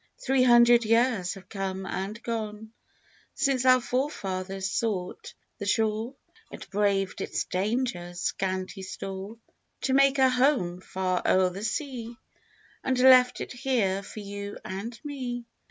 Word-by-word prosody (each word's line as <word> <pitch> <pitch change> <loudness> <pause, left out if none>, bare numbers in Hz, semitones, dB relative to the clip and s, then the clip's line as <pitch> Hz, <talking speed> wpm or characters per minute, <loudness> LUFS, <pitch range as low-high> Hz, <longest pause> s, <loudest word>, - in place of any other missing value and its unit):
Three 265 0 +1
hundred 240 -1 +6
years 225 -4 +2
have 195 - -13
come 195 -1 -4
and 200 +5 -4
gone 220 -1 -4 0.6
Since 260 -2 +1
our 255 0 +7
fore 255 +3 -1
fathers 190 -5 -4
sought 195 -6 -3 0.2
the 205 - -4
shore, 220 +4 0 0.4
And - - -9
braved 195 -1 0
its - - -2
dangers, 185 -3 -2
scanty 190 +1 -2
store. 195 +3 -6 0.4
To 265 - 0
make 275 0 +5
a 265 -1 +6
home 250 -9 +2
far 185 -1 -1
o'er 185 -1 +3
the 195 +3 -7
sea 240 -1 -4 0.7
And 260 -1 0
left 250 -1 +6
it - - -5
here 235 -7 0
for 210 +2 -9
you 200 0 -6
and 210 +5 -6
me. 250 -4 -4
215 Hz, 140 wpm, -27 LUFS, 190-250 Hz, 0.7 s, our